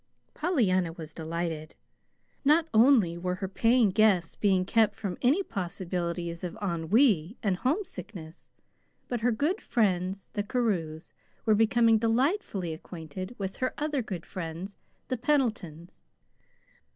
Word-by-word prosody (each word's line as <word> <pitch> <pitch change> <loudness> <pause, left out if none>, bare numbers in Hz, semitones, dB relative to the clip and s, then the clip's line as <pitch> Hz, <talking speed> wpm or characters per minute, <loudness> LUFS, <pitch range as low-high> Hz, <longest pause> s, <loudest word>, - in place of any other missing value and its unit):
Pollyanna 200 - +1
was 160 -3 -9
delighted. 160 -1 -4 0.7
Not 310 +3 +4
only 220 -8 +5
were 180 +1 -2
her 190 +1 -4
paying 225 +2 +3
guests 195 -5 +3
being 190 -3 +2
kept 220 +2 +3
from 195 -4 -4
any 290 +11 +3
possibilities 175 - -4
of 175 -2 -5
ennui 190 - +2
and 195 -4 +1
homesickness, 215 - -4 0.6
but 245 - -2
her 245 +2 +2
good 295 - 0
friends, 190 -4 0
the 205 - -1
Carews, 195 -9 -2 0.3
were 220 - +4
becoming 225 +1 +4
delightfully 230 - 0
acquainted 175 +5 -8
with 195 -1 -4
her 255 - -2
other 295 -2 -1
good 185 -7 -6
friends, 175 +2 -6 0.3
the 255 - -2
Pendletons. 225 - -1
195 Hz, 125 wpm, -28 LUFS, 175-240 Hz, 0.7 s, only